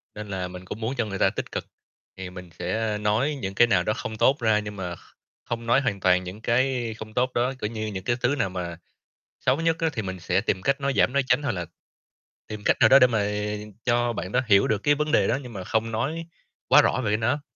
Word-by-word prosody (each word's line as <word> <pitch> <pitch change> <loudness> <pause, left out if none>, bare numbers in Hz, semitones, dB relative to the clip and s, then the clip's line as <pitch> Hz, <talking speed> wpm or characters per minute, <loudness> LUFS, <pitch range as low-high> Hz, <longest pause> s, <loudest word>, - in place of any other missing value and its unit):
nên 105 0 -7
là 95 -2 -3
mình 90 0 -10
cũng 110 - -7
muốn 125 +5 -2
cho 120 - +1
người 100 -2 -5
ta - - +4
tích - - -6
cực. - - -4 0.5
Thì 95 -1 -6
mình 90 -1 -10
sẽ 110 +4 -1
nói 110 +8 +1
những 95 -1 -4
cái 120 - +6
nào 90 -6 +3
đó 105 - 0
không 110 -3 -6
tốt 135 +6 +3
ra, 110 -2 +3
nhưng 105 0 -6
mà 90 -3 -5
kh - - -18 0.5
không 115 0 -3
nói 120 +4 +4
hoàn 115 -7 -1
toàn 90 0 +3
những 95 +4 -8
cái 120 -1 +1
không 110 0 -8
tốt 125 +2 0
đó, 125 +3 +1
kiểu 105 - -1
như, 110 -1 -4
những 95 -3 -5
cái 120 - +1
thứ 130 +4 +2
nào 115 -9 0
mà 90 -2 -5 0.6
xấu 140 - +1
nhất 165 0 +2
á 165 - +2
thì 115 - -3
mình 95 -2 -5
sẽ 90 +3 +1
tìm 95 -3 -1
cách 135 +3 +1
nói 140 0 0
giảm - - +3
nói 140 - +2
tránh 145 - +3
hoặc 140 - 0
là 90 -3 -4 0.8
tìm 105 -1 -7
cách - - +3
nào 110 - +6
đó 135 - +8
để 125 - +7
mà 110 -4 0 0.6
cho 120 -1 +2
bạn 95 -3 -5
đó 125 - +2
hiểu 100 -2 +5
được 110 - +1
cái 145 0 +4
vấn 150 +1 -1
đề - - +4
đó, - - +1
nhưng 125 - -9
mà 95 -3 -6
không 110 +3 -1
nói 140 +9 -2 0.4
quá - - +7
rõ 130 - +1
về 105 - +1
cái 105 - +2
nó. 120 +6 0
110 Hz, 265 wpm, -25 LUFS, 95-125 Hz, 0.8 s, đó